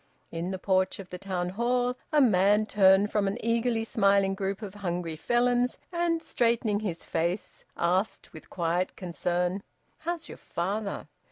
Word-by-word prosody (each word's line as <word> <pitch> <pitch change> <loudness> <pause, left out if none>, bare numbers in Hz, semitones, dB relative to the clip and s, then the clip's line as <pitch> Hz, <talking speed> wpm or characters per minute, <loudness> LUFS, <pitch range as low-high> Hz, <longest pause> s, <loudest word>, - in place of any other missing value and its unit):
In 170 +2 -3
the 190 - -3
porch 185 0 +1
of 195 -2 -10
the 180 - -6
Town 180 -2 -2
Hall, 245 +5 0 0.2
a 305 - +4
man 210 -3 +4
turned 200 -1 +4
from 205 -2 +1
an 195 +3 -1
eagerly 230 0 +1
smiling 200 -3 +3
group 195 +2 -3
of 195 -2 -6
hungry 175 -5 -3
Felons 245 +6 +1
and, 340 -1 0
straightening 230 -3 +1
his 185 -6 -4
face, 170 +4 -3
asked 185 +5 0
with 155 - -12
quiet 175 +1 -1
concern, 180 +1 -1 0.4
"How's 335 +1 -4
your - - -10
father?" 200 +4 -3
200 Hz, 155 wpm, -28 LUFS, 180-230 Hz, 0.4 s, a